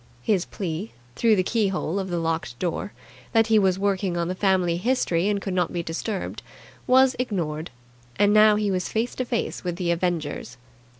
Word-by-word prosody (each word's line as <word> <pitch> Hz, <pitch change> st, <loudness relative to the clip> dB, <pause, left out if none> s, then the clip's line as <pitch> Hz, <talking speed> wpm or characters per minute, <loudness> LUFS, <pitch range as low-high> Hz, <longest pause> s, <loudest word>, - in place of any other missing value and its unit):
His 190 Hz, -, +1 dB
plea, 185 Hz, +2 st, -5 dB, 0.2 s
through 225 Hz, -, +4 dB
the 185 Hz, -, +2 dB
keyhole 195 Hz, -4 st, 0 dB
of 190 Hz, -1 st, -4 dB
the 175 Hz, -, -1 dB
locked 165 Hz, -6 st, -2 dB
door, 180 Hz, +6 st, -3 dB, 0.4 s
that 225 Hz, -1 st, +5 dB
he 215 Hz, -, +7 dB
was 190 Hz, -2 st, +2 dB
working 195 Hz, -2 st, 0 dB
on 170 Hz, 0 st, -1 dB
the -, -, -1 dB
family 185 Hz, -3 st, +1 dB
history 190 Hz, -5 st, +1 dB
and 205 Hz, -1 st, +1 dB
could 195 Hz, -1 st, -4 dB
not 180 Hz, -2 st, 0 dB
be 170 Hz, -1 st, -2 dB
disturbed, 180 Hz, +5 st, -4 dB, 0.5 s
was 260 Hz, +1 st, +5 dB
ignored; 170 Hz, -10 st, -2 dB, 0.5 s
and 205 Hz, 0 st, +3 dB
now 215 Hz, 0 st, +7 dB
he 210 Hz, -1 st, 0 dB
was 185 Hz, -1 st, -1 dB
face 225 Hz, +2 st, -1 dB
to 255 Hz, -, -3 dB
face 235 Hz, -1 st, -2 dB
with 175 Hz, -2 st, -2 dB
the 175 Hz, -1 st, -1 dB
avengers. 165 Hz, -8 st, -2 dB
190 Hz, 185 wpm, -24 LUFS, 170-210 Hz, 0.5 s, he